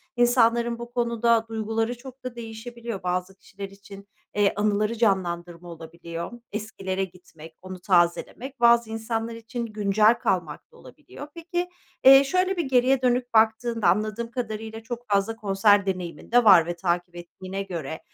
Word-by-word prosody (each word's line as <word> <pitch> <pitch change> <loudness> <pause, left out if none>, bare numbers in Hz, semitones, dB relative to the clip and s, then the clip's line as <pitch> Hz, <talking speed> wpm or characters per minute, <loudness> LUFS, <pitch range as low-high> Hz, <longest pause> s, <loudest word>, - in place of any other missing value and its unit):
İnsanların 235 -1 +3
bu 240 0 -9
konuda 235 -1 +1
duyguları 225 +1 -2
çok 260 +1 -13
da 255 -1 -6
değişebiliyor. 230 -2 -7
Bazı 180 +1 -2
kişiler 195 0 -10
için, 200 0 -14 0.3
eee, 205 -1 +3
anıları 210 +2 0
canlandırma 175 -5 -1
olabiliyor, 170 +2 -8 0.2
eskilere 195 -3 -3
gitmek, 165 -3 -12
onu 185 0 -9
tazelemek; 185 +9 0
bazı 235 -1 +5
insanlar 225 +1 -3
için 230 +1 -5
güncel 210 0 +3
kalmak 175 - -2
da 475 - -19
olabiliyor. 290 - -12
Peki, 350 +1 -3 0.3
eee, 270 +1 +9
şöyle 370 +6 0
bir 335 - 0
geriye 260 0 +3
dönüp 245 -1 0
baktığında, 225 0 +2
anladığım 215 +5 0
kadarıyla 220 -2 -5
çok 240 +1 -7
fazla 200 +2 +1
konser 205 -1 +3
deneyimin 180 -1 -5
de 245 0 +5
var 185 -6 +7
ve 175 - -4
takip 175 0 -2
ettiğine 185 +3 -7
göre 160 -5 -6
220 Hz, 145 wpm, -25 LUFS, 190-235 Hz, 0.3 s, eee